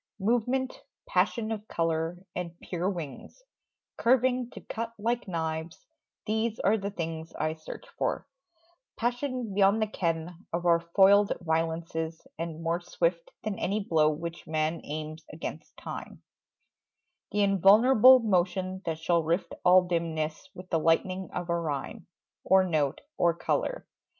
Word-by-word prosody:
Movement, 245 +5 0 0.3
passion 230 - +1
of 215 -1 -4
colour 165 +1 -1 0.2
and 170 -1 -5
pure 180 +1 -2
wings, 175 - -7 0.5
Curving 250 0 +2
to - - -10
cut 230 0 -5
like 235 +2 -1
knives 160 - -4 0.4
these 220 +1 -1
are 200 +4 +4
the 200 -2 -3
things 165 -3 -5
I 155 - -1
search 160 - -10
for: - - -1 0.7
passion 245 -2 -2
beyond 200 +2 +4
the 220 - +2
ken 170 -2 -3
Of 170 +1 -2
our 170 -1 +5
foiled 195 +4 +5
violences, 160 0 -2 0.2
and, 165 -1 -4
more 170 +1 0
swift 170 -1 -1
Than 210 -2 -3
any 200 +3 0
blow 160 -5 +3
which 170 +2 -5
man 155 +1 -1
aims 155 +1 -6
against 155 - -7
time, - - -8 1.1
The 205 0 +2
invulnerable, 215 +6 +7
motion 185 -2 0
that 165 -2 -2
shall 170 +1 +2
rift 165 +4 -1
All 180 +1 +7
dimness 165 -1 -2
with 185 0 -10
the 165 - +3
lightning 185 +4 +1
of 175 -1 -4
a 170 -1 0
rhyme, 145 -5 -4 0.4
Or 190 +1 +5
note, 155 -6 0 0.2
or 170 -1 +3
colour. - - -1
175 Hz, 140 wpm, -28 LUFS, 165-210 Hz, 1.1 s, invulnerable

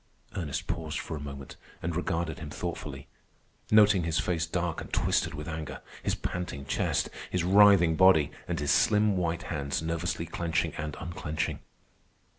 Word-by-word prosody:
Ernest 80 -8 -3
paused - - -3
for 80 - -4
a - - -5
moment 70 -2 -8 0.3
and 85 0 -2
regarded 85 -3 -1
him 80 -2 -7
thoughtfully, - - -5 0.6
noting 105 -3 +6
his 80 -1 -1
face 85 -2 0
dark 85 -1 -2
and - - -9
twisted - - +1
with 75 +1 -6
anger, 80 -2 -5 0.2
his - - 0
panting 85 -6 -4
chest, - - 0 0.2
his 90 -2 0
writhing 95 -3 +6
body, 80 -5 +5 0.2
and - - -2
his 75 0 +1
slim 105 -1 +4
white 85 -2 -1
hands 70 -2 -1
nervously 85 +1 -2
clenching 85 0 -1
and 75 -1 -5
unclenching. 80 -3 -3
85 Hz, 155 wpm, -29 LUFS, 75-90 Hz, 0.6 s, noting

